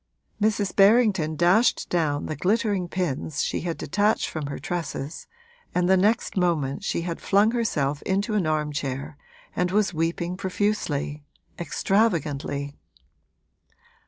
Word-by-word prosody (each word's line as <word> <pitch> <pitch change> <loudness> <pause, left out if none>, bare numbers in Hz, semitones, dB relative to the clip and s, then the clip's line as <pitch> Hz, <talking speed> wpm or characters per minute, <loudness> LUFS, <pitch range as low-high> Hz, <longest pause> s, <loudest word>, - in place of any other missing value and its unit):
Mrs. 205 -2 +1
Berrington 200 -6 +4
dashed 180 +9 +3
down 150 -4 0
the 155 - -3
glittering 200 +2 0
pins 160 -4 -2
she - - -2
had 170 -1 -3
detached 205 +7 +1
from 155 -3 -4
her 140 - -5
tresses, 155 -2 -5 0.5
and 180 0 +2
the 190 - +5
next 210 +5 +1
moment 165 -7 0
she - - -1
had 170 -1 -4
flung 205 +3 +3
herself 150 - -1
into 200 +3 -1
an 195 -6 +1
armchair 145 -2 -2 0.4
and 180 0 +1
was 200 0 +1
weeping 170 +2 -2
profusely, 185 -7 -2 0.4
extravagantly. 150 -8 0
175 Hz, 125 wpm, -25 LUFS, 150-200 Hz, 0.5 s, the